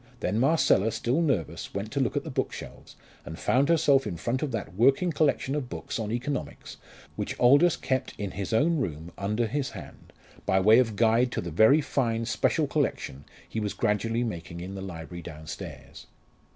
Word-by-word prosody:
Then 105 +4 0
Marcella, 130 -6 +3
still 125 +9 0
nervous, 130 - -2
went - - -4
to - - -1
look - - 0
at - - -1
the - - -6
bookshelves, - - -5 0.3
and 80 - -8
found 135 +4 +2
herself 145 -5 +4
in 85 - -4
front 120 +9 -2
of 150 - -2
that 115 - -4
working 135 - +3
collection 140 -3 +1
of 145 -4 -3
books - - -5
on 110 -1 -3
economics 125 +4 -4 0.4
which - - -4
Aldous 145 +7 +5
kept 130 -1 -2
in 100 -2 -4
his 100 -1 -5
own 155 +9 +3
room 85 - -4
under 105 +4 -1
his 135 +4 -2
hand, - - -11 0.3
by 95 - +2
way 110 +5 +6
of 115 -4 +1
guide 115 +3 +3
to - - -1
the 85 - -6
very 110 - +5
fine 115 -5 -1
special 110 - +1
collection 70 +2 -2 0.2
he 110 - -4
was 105 -2 -3
gradually 115 +3 0
making 85 -6 -5
in 90 +3 -6
the 95 - -6
library 85 -2 -7
downstairs. 75 -3 -9
115 Hz, 185 wpm, -27 LUFS, 95-135 Hz, 0.4 s, way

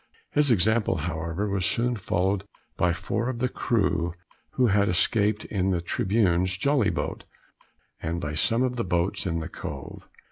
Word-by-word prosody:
His 150 -1 +4
example, 110 0 +3
however, 85 +4 -2
was 100 -2 -1
soon 120 +6 +1
followed 95 -1 0 0.3
by 90 - +2
four 95 +7 -2
of 130 - -3
the 125 +2 +1
crew 90 -9 0 0.4
who 130 - +3
had 100 -1 +3
escaped 105 +3 +2
in 95 -2 -1
the 90 -2 +1
Tribune's 95 0 +1
jolly 135 -2 +2
boat, - - -3 0.8
and 85 +2 -2
by 75 -2 -4
some 115 +10 +2
of 125 -1 -1
the 115 - 0
boats 90 +2 0
in 85 -2 -1
the 80 - -4
Cove. 70 -2 -8
95 Hz, 165 wpm, -26 LUFS, 85-115 Hz, 0.8 s, His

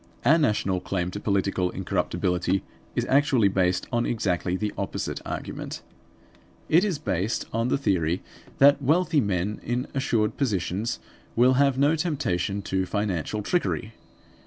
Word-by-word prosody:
Our 160 +3 +6
national 105 - +1
claim 90 -1 -2
to 105 - -5
political 100 -3 0
incorruptibility 90 0 -1 0.3
is - - 0
actually 130 -6 +3
based 90 -1 +1
on 120 0 +1
exactly 90 -5 0
the 105 +2 -2
opposite - - -3
argument; - - -5 0.9
it 170 +4 +5
is 195 -7 0
based 95 -2 -1
on 115 +1 +1
the 130 - +2
theory 90 - 0 0.3
that 140 +1 +6
wealthy 155 +2 +3
men 100 -1 -1
in 120 +2 -2
assured 115 -6 0
positions 110 -2 -1 0.4
will 125 +2 +5
have 140 -2 +3
no 145 +4 +4
temptation 115 - -1
to 95 -1 -1
financial 105 0 -2
trickery. 115 - -1
105 Hz, 135 wpm, -26 LUFS, 95-135 Hz, 0.9 s, Our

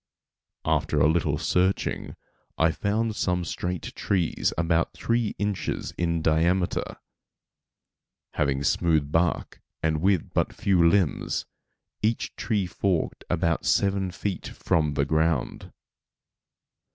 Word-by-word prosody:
After 75 -1 +1
a 70 - +5
little 80 +2 +1
searching 95 +2 0 0.4
I 80 0 +4
found 105 +7 -1
some 90 -3 0
straight 90 0 -4
trees 95 -5 0
about 85 0 +1
three 115 -2 0
inches 105 -2 -2
in 85 -2 -1
diameter, 85 +3 +1 1.4
having 70 -1 0
smooth 75 -1 +2
bark 85 +1 0 0.2
and 80 -1 +1
with 95 -2 +1
but - - +1
few 95 -4 +2
limbs, 95 -5 0 0.6
each 110 +2 -1
tree 105 -5 0
forked 90 0 -1
about 85 -1 +1
seven 100 -1 +2
feet 95 +1 -4
from 75 -3 0
the 70 -1 +2
ground. 80 -1 0
85 Hz, 110 wpm, -26 LUFS, 80-95 Hz, 1.4 s, a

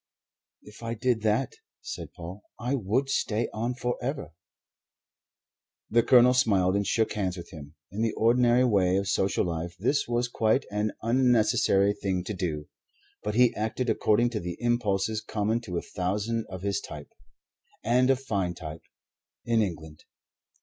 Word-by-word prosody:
"If 105 +2 -14
I 115 0 -3
did 120 0 0
that," 110 +4 +1 0.3
said - - -6
Paul, 90 +4 -9 0.2
"I 120 +4 -1
would 130 +2 0
stay 115 -4 0
on 120 +3 -2
forever." 125 - -3 1.6
The 115 +2 +5
Colonel 125 +1 +6
smiled 100 -7 +3
and 100 -1 0
shook 110 +1 +1
hands 95 -3 -2
with 85 - -9
him. 75 -3 -11 0.2
In 105 +3 -4
the 115 -1 +1
ordinary 120 +2 +4
way 95 -6 +3
of 100 0 -1
social 95 0 +1
life 85 0 -4
this 125 +9 +1
was 120 +1 0
quite 115 +2 +1
an 105 +1 -1
unnecessary 115 -5 +3
thing 95 -3 -2
to 100 - -4
do. 80 -6 -3 0.5
But 105 0 -3
he 125 0 +5
acted 110 +3 -1
according 120 +3 +2
to 110 - -2
the 90 -2 -5
impulses 110 -3 0
common 110 +2 -1
to 90 -7 -5
a - - -3
thousand 105 +5 -2
of 95 -1 -7
his 100 0 -1
type 75 -1 -10 0.7
and 125 +3 +3
a 135 - +5
fine 100 -9 -2
type 80 -2 -8 0.6
in 115 -1 +2
England. 80 -6 -5
110 Hz, 155 wpm, -27 LUFS, 95-120 Hz, 1.6 s, Colonel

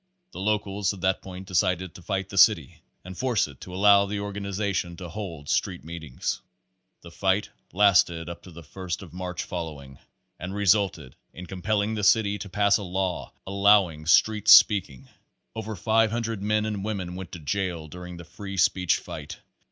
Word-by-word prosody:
The - - -9
locals 100 -1 -1
at 95 - -12
that 95 0 +1
point 95 0 -9
decided 90 -1 0
to - - -12
fight 95 +1 -3
the 95 - -7
city 85 - +4 0.2
and 95 0 -8
force 120 0 +1
it 70 -3 -15
to 90 - -9
allow 100 +1 +5
the 100 +1 -3
organization 100 -3 -3
to 90 -2 -8
hold 85 -6 -7
street - - -1
meetings. 80 -5 -5 0.6
The 85 - -12
fight 95 +3 0 0.2
lasted 90 -4 +3
up 85 0 -7
to 90 - -13
the 85 0 -11
first 90 +4 -6
of 85 -4 -13
March 90 -1 -4
following, 75 -6 -7 0.4
and 90 +3 -6
resulted 95 -8 +1 0.2
in 90 - -9
compelling 100 +4 -1
the 105 -1 -3
city 105 -1 +3
to 100 - -7
pass 100 +1 +3
a - - -7
law 95 -1 -3
allowing 100 -5 +3
street 105 +5 +3
speak 105 -3 +7
ing. 65 -2 -15 0.5
Over 110 -1 -5
500 115 +1 0
men 105 +1 +1
and 105 -2 -3
women 95 -5 -4
went 90 -1 -8
to 85 - -6
jail 85 0 -3
during 90 +2 -9
the 85 - -10
free 100 +3 -8
speech 90 -1 +3
fight. 75 -2 -8
95 Hz, 175 wpm, -26 LUFS, 85-100 Hz, 0.6 s, speak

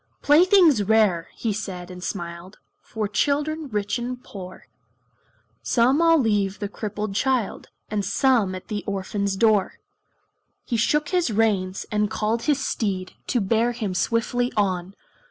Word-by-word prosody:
"Playthings 330 - +5
rare," 205 -5 +2
he 225 -3 -2
said 190 -4 -6
and 180 0 -9
smiled, 175 0 -6 0.2
"For 215 -2 -4
children 295 +7 0
rich 210 -1 -2
and 250 +1 -5
poor; 185 -2 -10 1.0
Some 255 +6 +2
I'll 330 -1 +5
leave 205 -5 +1
the 205 - -3
crippled 210 0 -5
child, 250 0 -1 0.2
And 210 -1 -2
some 215 -2 +2
at 185 - -9
the 210 -2 -4
orphan's 200 0 -2
door." 215 -1 +3 0.9
He 240 - -2
shook 300 +7 +1
his 360 -6 +1
reins, 200 -4 0
and 210 -1 +1
called 220 +1 -1
his 285 -3 +1
steed 190 -4 -2
To 245 - +1
bear 230 +4 +1
him 215 -5 -3
swiftly 235 +5 0
on. 190 -2 0
215 Hz, 140 wpm, -24 LUFS, 195-245 Hz, 1.0 s, Playthings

